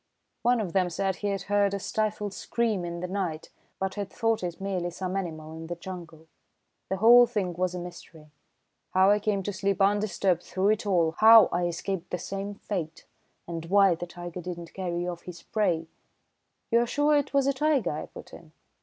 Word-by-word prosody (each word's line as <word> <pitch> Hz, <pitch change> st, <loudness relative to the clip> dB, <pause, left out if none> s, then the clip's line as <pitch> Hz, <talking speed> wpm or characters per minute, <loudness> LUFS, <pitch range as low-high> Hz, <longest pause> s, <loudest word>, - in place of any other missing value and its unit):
"One 245 Hz, 0 st, +3 dB
of 190 Hz, -6 st, -3 dB
them 185 Hz, -2 st, +2 dB
said 190 Hz, +2 st, -1 dB
he 205 Hz, -, -3 dB
had 195 Hz, -2 st, -2 dB
heard 200 Hz, 0 st, +2 dB
a -, -, -3 dB
stifled 210 Hz, 0 st, -2 dB
scream 225 Hz, -5 st, -1 dB
in 170 Hz, 0 st, -5 dB
the 180 Hz, -, -3 dB
night, 180 Hz, -5 st, -3 dB, 0.3 s
but 190 Hz, 0 st, -2 dB
had 200 Hz, -2 st, -4 dB
thought 225 Hz, -2 st, 0 dB
it 175 Hz, -2 st, -4 dB
merely 190 Hz, -3 st, -2 dB
some 185 Hz, +2 st, -4 dB
animal 160 Hz, -5 st, -4 dB
in 160 Hz, 0 st, -8 dB
the 175 Hz, -, -4 dB
jungle. 170 Hz, -2 st, -9 dB, 0.6 s
The 190 Hz, -, -1 dB
whole 240 Hz, +4 st, +8 dB
thing 205 Hz, -6 st, -2 dB
was 180 Hz, +1 st, -1 dB
a -, -, -3 dB
mystery. 170 Hz, -3 st, -11 dB, 0.6 s
How 190 Hz, +1 st, +6 dB
I 210 Hz, -, +3 dB
came 205 Hz, -2 st, -1 dB
to 205 Hz, -, -3 dB
sleep 195 Hz, +1 st, -1 dB
undisturbed 195 Hz, -3 st, +2 dB
through 190 Hz, +3 st, 0 dB
it 215 Hz, 0 st, 0 dB
all, 170 Hz, -5 st, +3 dB
how 225 Hz, 0 st, +9 dB
I 175 Hz, 0 st, +1 dB
escaped 175 Hz, +1 st, -4 dB
the 180 Hz, -, -2 dB
same 195 Hz, +3 st, -5 dB
fate, 175 Hz, -6 st, -5 dB, 0.4 s
and 165 Hz, -1 st, -5 dB
why 195 Hz, 0 st, +5 dB
the 175 Hz, +1 st, -6 dB
tiger 175 Hz, 0 st, -7 dB
did 175 Hz, 0 st, -5 dB
not 170 Hz, -1 st, -10 dB
carry 175 Hz, -2 st, -3 dB
off 175 Hz, -1 st, -5 dB
his 175 Hz, -2 st, -9 dB
prey 180 Hz, -7 st, 0 dB, 0.4 s
" -, -, -50 dB
"You 235 Hz, -, +5 dB
are 240 Hz, -, +1 dB
sure 295 Hz, +4 st, +2 dB
it 290 Hz, -1 st, +1 dB
was 275 Hz, -1 st, +2 dB
a 275 Hz, -, +2 dB
tiger?" 275 Hz, -, +1 dB
I 150 Hz, -, -5 dB
put -, -, -13 dB
in. 160 Hz, -2 st, -13 dB
190 Hz, 205 wpm, -27 LUFS, 175-205 Hz, 0.6 s, how